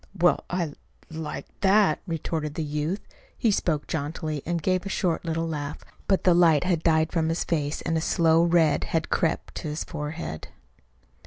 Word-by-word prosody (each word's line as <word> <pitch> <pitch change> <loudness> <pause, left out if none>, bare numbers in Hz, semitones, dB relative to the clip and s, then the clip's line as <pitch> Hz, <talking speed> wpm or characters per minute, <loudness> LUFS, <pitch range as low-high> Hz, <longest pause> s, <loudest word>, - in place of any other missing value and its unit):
"Well, 175 0 +3
I 180 -1 0
I 150 -3 -5 0.4
like 160 -1 -5
that," 200 +1 +4
retorted 155 -2 -3
the 160 - -2
youth. 150 +6 -2 0.4
He 230 - +2
spoke 160 -6 0
jauntily, 155 -1 -3
and 170 0 0
gave 185 +3 +1
a 200 - -5
short 180 -3 0
little 165 0 -1
laugh. 150 -2 -4 0.3
But 195 - +2
the 180 - +5
light 170 -4 +5
had 180 -3 +1
died 160 -1 +2
from 160 -2 +1
his 165 - 0
face 150 -3 -1
and 165 - 0
a 160 - +1
slow 165 -1 +3
red 170 -3 +3
had 160 -1 -1
crept 165 -3 0
to - - -4
his 150 +1 -3
forehead. 150 - -5
165 Hz, 180 wpm, -26 LUFS, 155-175 Hz, 0.4 s, the